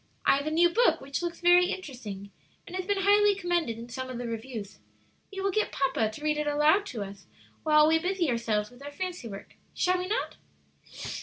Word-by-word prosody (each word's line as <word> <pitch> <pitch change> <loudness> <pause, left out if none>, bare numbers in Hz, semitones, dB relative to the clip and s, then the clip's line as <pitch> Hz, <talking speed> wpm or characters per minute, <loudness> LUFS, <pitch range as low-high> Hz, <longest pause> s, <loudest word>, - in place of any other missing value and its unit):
I - - +5
have 280 +2 -3
a - - +2
new 335 +3 +4
book 465 +8 +3
which 275 +3 -4
looks 345 0 -4
very 355 +1 +6
interesting, 220 - -6 0.3
and 360 - -8
has 370 0 -3
been 405 -1 +1
highly 410 0 +5
commended 350 - -1
in 230 +1 -8
some 260 +2 -6
of 255 - -5
the 245 - -4
reviews. 225 -2 -6 0.5
We 390 -1 -5
will 395 0 +1
get 430 +3 0
papa 265 -5 +1
to 220 +8 -10
read 305 0 +1
it 300 - -1
aloud 300 +8 +3
to 225 - -4
us 195 0 -11 0.3
while 305 -1 +5
we 320 +1 +4
busy 360 0 0
ourselves 230 -3 -1
with 245 +3 -15
our 285 - -7
fancy 360 -4 -5
work. 200 -2 -9 0.2
Shall 365 0 +2
we 365 - -3
not?" 435 +5 -2
300 Hz, 215 wpm, -28 LUFS, 235-365 Hz, 0.5 s, very